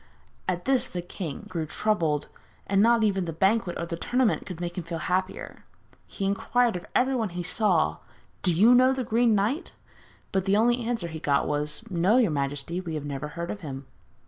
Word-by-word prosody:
At 175 Hz, -1 st, -2 dB
this 260 Hz, -1 st, +2 dB
the 175 Hz, -1 st, -4 dB
king 175 Hz, -4 st, -6 dB
grew 165 Hz, -4 st, -3 dB
troubled, 160 Hz, -6 st, 0 dB, 0.4 s
and 195 Hz, 0 st, +2 dB
not 230 Hz, +1 st, +4 dB
even 195 Hz, -4 st, +1 dB
the 165 Hz, -, -3 dB
banquet 190 Hz, +3 st, +1 dB
or 170 Hz, -, -3 dB
the 170 Hz, -, -4 dB
tournament 245 Hz, +6 st, 0 dB
could 180 Hz, -3 st, -7 dB
make 175 Hz, 0 st, -4 dB
him 180 Hz, -, -4 dB
feel 170 Hz, 0 st, -5 dB
happier. 185 Hz, +3 st, -3 dB, 0.4 s
He 195 Hz, -, -4 dB
inquired 230 Hz, +3 st, +1 dB
of 180 Hz, -, -6 dB
everyone 250 Hz, -4 st, +2 dB
he 175 Hz, 0 st, -5 dB
saw, 175 Hz, -, +2 dB, 0.4 s
'Do 180 Hz, -, +2 dB
you 210 Hz, +9 st, +6 dB
know 255 Hz, +1 st, +6 dB
the 260 Hz, -1 st, -2 dB
Green 230 Hz, 0 st, +3 dB
Knight?' 225 Hz, -, -1 dB, 0.6 s
but 190 Hz, -1 st, 0 dB
the 200 Hz, +1 st, +3 dB
only 240 Hz, +3 st, +3 dB
answer 230 Hz, -6 st, -2 dB
he 160 Hz, -1 st, -6 dB
got 140 Hz, -2 st, +1 dB
was: 150 Hz, +6 st, -2 dB
'No, 185 Hz, +6 st, +3 dB
your 230 Hz, -9 st, +3 dB
majesty, 145 Hz, +4 st, -2 dB
we 165 Hz, -3 st, -5 dB
have 150 Hz, -1 st, -4 dB
never 145 Hz, 0 st, -4 dB
heard 170 Hz, +3 st, -5 dB
of 210 Hz, -, -6 dB
him.' 140 Hz, -5 st, -7 dB
185 Hz, 200 wpm, -26 LUFS, 165-225 Hz, 0.6 s, you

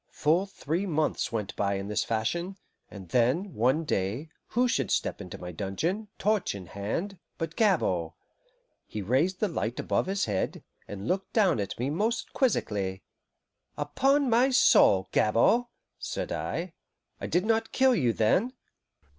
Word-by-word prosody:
Full 170 Hz, +6 st, +1 dB
three 185 Hz, 0 st, -3 dB
months 155 Hz, -6 st, 0 dB
went 105 Hz, -4 st, -3 dB
by 100 Hz, -1 st, 0 dB
in 100 Hz, 0 st, -4 dB
this 105 Hz, -, 0 dB
fashion, 170 Hz, -, -2 dB, 0.3 s
and 95 Hz, -4 st, -11 dB
then, 130 Hz, -, +1 dB
one 130 Hz, +8 st, +2 dB
day, 115 Hz, +3 st, -2 dB, 0.2 s
who 245 Hz, +2 st, +2 dB
should 135 Hz, -, 0 dB
step -, -, -1 dB
into 90 Hz, -, -8 dB
my 90 Hz, 0 st, -7 dB
dungeon, 160 Hz, -, -2 dB
torch 210 Hz, -, 0 dB
in 95 Hz, -2 st, -8 dB
hand, 115 Hz, -, -4 dB, 0.2 s
but 165 Hz, -1 st, -4 dB
Gabord! 95 Hz, -, +1 dB, 0.7 s
He 105 Hz, -, -5 dB
raised 145 Hz, -, +1 dB
the 215 Hz, -, +2 dB
light 120 Hz, -, -3 dB
above -, -, 0 dB
his 195 Hz, +1 st, 0 dB
head, 100 Hz, -3 st, -2 dB, 0.2 s
and 100 Hz, +1 st, -6 dB
looked 190 Hz, +1 st, -2 dB
down 190 Hz, -, +3 dB
at 100 Hz, -1 st, -3 dB
me 130 Hz, +4 st, -1 dB
most 225 Hz, +8 st, -1 dB
quizzically. 100 Hz, -, 0 dB, 0.7 s
"Upon 270 Hz, -, +2 dB
my 245 Hz, +3 st, +4 dB
soul 95 Hz, -, +5 dB
Gabord!" 120 Hz, -, +3 dB, 0.3 s
said -, -, -4 dB
I. -, -, -3 dB, 0.5 s
"I -, -, -4 dB
did 180 Hz, +3 st, +1 dB
not 225 Hz, 0 st, +1 dB
kill 265 Hz, -1 st, +4 dB
you, 125 Hz, -, +2 dB
then?" 180 Hz, -, +2 dB
150 Hz, 155 wpm, -28 LUFS, -, 0.7 s, soul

